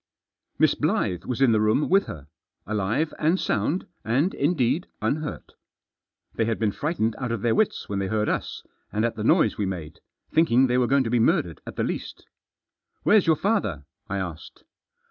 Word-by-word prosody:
Miss -, -, +4 dB
Blyth 90 Hz, -2 st, -1 dB
was 125 Hz, +1 st, -3 dB
in 130 Hz, -, +5 dB
the 110 Hz, -1 st, +3 dB
room 110 Hz, +7 st, +2 dB
with 195 Hz, +2 st, +3 dB
her. 75 Hz, -3 st, -8 dB, 0.4 s
Alive 110 Hz, -, -1 dB
and 165 Hz, +5 st, +2 dB
sound, 125 Hz, -, -1 dB, 0.2 s
and, 130 Hz, -, +1 dB
indeed, 150 Hz, +1 st, +1 dB
unhurt. 150 Hz, 0 st, -3 dB, 0.8 s
They 110 Hz, -, 0 dB
had 115 Hz, 0 st, -1 dB
been 110 Hz, -2 st, +1 dB
frightened 115 Hz, -, -1 dB
out 125 Hz, -3 st, -3 dB
of 115 Hz, -4 st, -3 dB
their 115 Hz, -1 st, +3 dB
wits 215 Hz, -, 0 dB
when 100 Hz, -1 st, -2 dB
they 95 Hz, -, -1 dB
heard 105 Hz, +1 st, 0 dB
us, -, -, -3 dB, 0.3 s
and 110 Hz, +2 st, 0 dB
at 115 Hz, -, -1 dB
the 105 Hz, -, -4 dB
noise -, -, +3 dB
wemade^ 95 Hz, -7 st, -4 dB, 0.4 s
thinking 135 Hz, -5 st, +4 dB
they 125 Hz, 0 st, +2 dB
were 125 Hz, -, +2 dB
going 140 Hz, +1 st, +3 dB
to 115 Hz, -, -3 dB
be 120 Hz, -, +3 dB
murdered, 85 Hz, -7 st, +1 dB
at -, -, -7 dB
the -, -, -1 dB
least -, -, -5 dB, 0.4 s
" -, -, -51 dB
Where's 210 Hz, -4 st, +4 dB
your 160 Hz, -, +5 dB
father? 150 Hz, -, -1 dB
" -, -, -53 dB
I 100 Hz, -, -2 dB
asked. 90 Hz, -5 st, -7 dB
115 Hz, 190 wpm, -25 LUFS, 105-150 Hz, 0.8 s, in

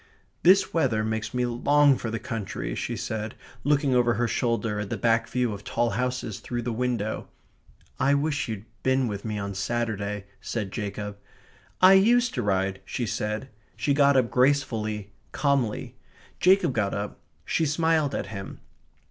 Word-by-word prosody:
"This 190 Hz, +2 st, +5 dB
weather 120 Hz, -10 st, +2 dB
makes 110 Hz, 0 st, -2 dB
me 125 Hz, 0 st, 0 dB
long 140 Hz, +4 st, +4 dB
for 115 Hz, -, -4 dB
the 115 Hz, -, -2 dB
country," 105 Hz, -, -4 dB
she -, -, -3 dB
said, 110 Hz, 0 st, -4 dB, 0.3 s
looking 145 Hz, -2 st, +2 dB
over 120 Hz, -1 st, +3 dB
her 120 Hz, 0 st, +1 dB
shoulder 115 Hz, -4 st, 0 dB
at 105 Hz, -1 st, -4 dB
the 120 Hz, -, -2 dB
back 115 Hz, +2 st, +2 dB
view 125 Hz, -2 st, 0 dB
of 100 Hz, 0 st, -8 dB
tall 115 Hz, +3 st, 0 dB
houses 125 Hz, -4 st, -2 dB
through 120 Hz, -1 st, -4 dB
the 120 Hz, 0 st, -2 dB
window. 115 Hz, -3 st, -2 dB, 0.7 s
"I 140 Hz, +2 st, +3 dB
wish 145 Hz, -1 st, 0 dB
you'd 110 Hz, -2 st, -5 dB, 0.2 s
been 130 Hz, -1 st, +2 dB
with 100 Hz, -2 st, -4 dB
me 105 Hz, -1 st, -2 dB
on 100 Hz, -1 st, -3 dB
Saturday," 105 Hz, -1 st, -2 dB, 0.2 s
said 105 Hz, -5 st, -3 dB
Jacob. 105 Hz, -1 st, -5 dB, 0.6 s
"I 185 Hz, +1 st, +9 dB
used 240 Hz, +5 st, +4 dB
to 125 Hz, -, -1 dB
ride," 95 Hz, -2 st, 0 dB
she 120 Hz, -, -3 dB
said. 110 Hz, +2 st, -3 dB, 0.3 s
She 145 Hz, -, +1 dB
got 140 Hz, -1 st, +5 dB
up 125 Hz, -3 st, +2 dB
gracefully, 110 Hz, -6 st, +1 dB, 0.2 s
calmly. 140 Hz, -7 st, 0 dB, 0.4 s
Jacob 185 Hz, -5 st, +4 dB
got 105 Hz, -4 st, 0 dB
up. 100 Hz, 0 st, -4 dB, 0.3 s
She 160 Hz, -, +1 dB
smiled 155 Hz, -1 st, +1 dB
at -, -, -2 dB
him. 100 Hz, -1 st, -7 dB
120 Hz, 165 wpm, -26 LUFS, 105-140 Hz, 0.7 s, I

